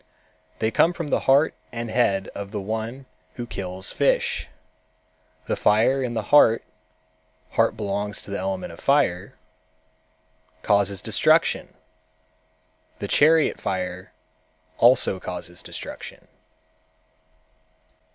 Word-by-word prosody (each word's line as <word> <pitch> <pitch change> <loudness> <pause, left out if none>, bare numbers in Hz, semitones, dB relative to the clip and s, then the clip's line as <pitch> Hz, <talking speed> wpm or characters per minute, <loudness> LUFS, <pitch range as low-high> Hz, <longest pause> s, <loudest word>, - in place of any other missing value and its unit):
They 110 - 0
come 170 +8 +3
from 165 -4 -5
the - - +2
heart 140 +4 +5 0.2
and 115 -1 -5
head 100 -5 +1
of 100 -1 -6
the 105 0 -4
one 110 +6 -5 0.3
who 120 - -5
kills 95 -4 -5
fish. - - +1 1.0
The - - -1
fire 115 +6 +3
in 120 -2 -3
the 110 - -1
heart 115 -6 +6 0.9
(heart - - +1
belongs 105 -1 -3
to - - -11
the 100 - -3
element 95 -3 -4
fire) 115 -10 +1 1.3
causes 100 -1 +1
destruction. - - +2 1.2
The - - -5
chariot 160 +1 +4
fire 90 0 -4 0.7
also 120 -5 +4
causes 90 -1 -7
destruction." - - -9
105 Hz, 105 wpm, -24 LUFS, 95-125 Hz, 1.3 s, heart